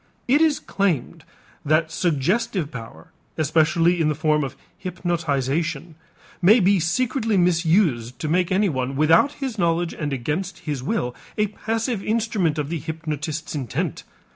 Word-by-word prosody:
It 280 +5 +4
is 315 -3 +3
claimed 185 -10 -1 0.4
that 155 +2 +2
suggestive 170 - 0
power, 120 +5 -10 0.3
especially 165 +2 +2
in 155 - +2
the 150 - 0
form 155 0 +1
of 135 0 -5 0.2
hypnotization, 165 -3 -2 0.5
may 210 +7 +6
be 195 0 +4
secretly 225 - 0
misused 165 - +2
to 155 - -4
make 175 +3 +1
anyone 140 -10 0
without 165 - +4
his 265 -7 -5
knowledge 170 -1 +1
and 150 -2 -4
against 150 +9 -3
his 145 -5 -3
will 130 - -1 0.2
a 210 - +3
passive 225 0 -2
instrument 215 -8 0
of 150 -1 -2
the 165 -1 -2
hypnotist's 155 -1 -4
intent. 135 -7 -3
165 Hz, 140 wpm, -23 LUFS, 150-195 Hz, 0.5 s, may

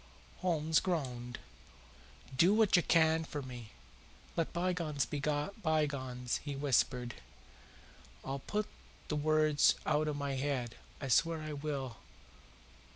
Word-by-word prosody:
Holmes 160 -3 +2
groaned. 125 -9 -2 1.0
"Do 175 +9 +5
what 220 -3 +5
you 175 - +6
can 160 -1 +4
for 145 -3 -5
me. 120 -4 -8 0.7
Let 165 - 0
bygones 170 -6 0
be 145 +5 -4
bygones," 145 - -1
he 145 -1 -5
whispered. 125 -3 +1 1.1
"I'll 135 +1 -3
put 210 +9 -2 0.4
the 150 - 0
words 155 0 +4
out 155 0 +2
of 150 - -1
my 140 -1 -2
head 130 -4 -1 0.3
I 135 - -4
swear 160 +4 +3
I 155 0 -4
will. 140 -5 -4
150 Hz, 120 wpm, -34 LUFS, 135-160 Hz, 1.1 s, you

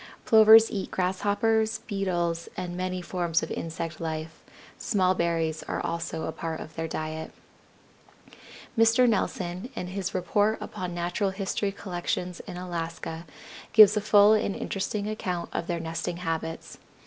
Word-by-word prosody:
Plovers 220 0 +8
eat 200 -4 -3
Grasshoppers, 205 +4 +1
Beetles, 175 -5 -1
and 180 -1 -4
many 185 0 -3
forms 170 -3 0
of 160 - -5
insect 165 0 -5
life; 160 0 -5 0.4
small 185 -3 +2
berries 165 -3 0
are - - -2
also 165 -1 -3
a - - -2
part 160 0 -5
of 155 - -9
their 165 0 -3
diet. 155 0 -5 1.4
Mr. 230 +2 +5
Nelson, 190 -1 -1
in - - -4
his 190 0 -4
"Report 205 +4 +1
Upon 180 -1 -5
Natural 175 +3 -1
History 195 +1 -2
Collections 180 -2 -4
in 175 - -6
Alaska," 165 -2 -5 0.5
gives 215 -1 +9
a 210 - +1
full 210 0 +6
and 210 -2 +1
interesting 200 +1 -3
account 185 -5 -3
of 170 - -3
their 170 -1 -1
nesting 165 +1 -4
habits. 165 -1 -4
180 Hz, 140 wpm, -27 LUFS, 165-205 Hz, 1.4 s, gives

